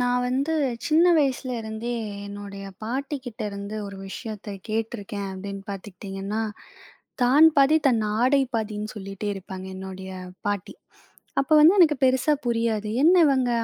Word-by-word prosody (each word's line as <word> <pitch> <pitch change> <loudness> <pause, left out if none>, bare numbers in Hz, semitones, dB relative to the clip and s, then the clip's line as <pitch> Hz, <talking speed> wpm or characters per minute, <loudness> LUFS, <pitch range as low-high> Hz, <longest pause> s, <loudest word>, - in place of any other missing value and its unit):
நான் 245 0 +2
வந்து 275 +5 0 0.3
சின்ன 320 +1 +4
வயசுல 270 -2 0
இருந்தே, 220 +2 -4 0.3
என்னுடைய 200 -1 -8 0.2
பாட்டிகிட்டேந்து 225 -5 -4
ஒரு 200 0 -8
விஷயத்த 210 -1 -6
கேட்டுருக்கேன். 215 -2 -3
அப்படின்னு 195 +1 -6
பார்த்துக்கிட்டிங்கன்னா 195 +2 -5 0.8
"தான் 275 +6 +7
பாதி 280 +3 +6
தன் 230 -4 +2 0.2
ஆடை 270 +3 +4
பாதின்னு" 215 -1 -2
சொல்லிகிட்டே 195 +1 -5
இருப்பாங்க 190 -1 -8
என்னுடைய 190 0 -7 0.4
பாட்டி. 205 -3 -3 0.7
அப்ப 275 - -4
வந்து 335 +6 +7
எனக்கு 310 -4 +6
பெருசா 260 +3 +3
புரியாது. 230 -3 0 0.2
என்ன 350 +3 +7
இவங்க 260 -3 +2
220 Hz, 125 wpm, -25 LUFS, 200-260 Hz, 0.8 s, தான்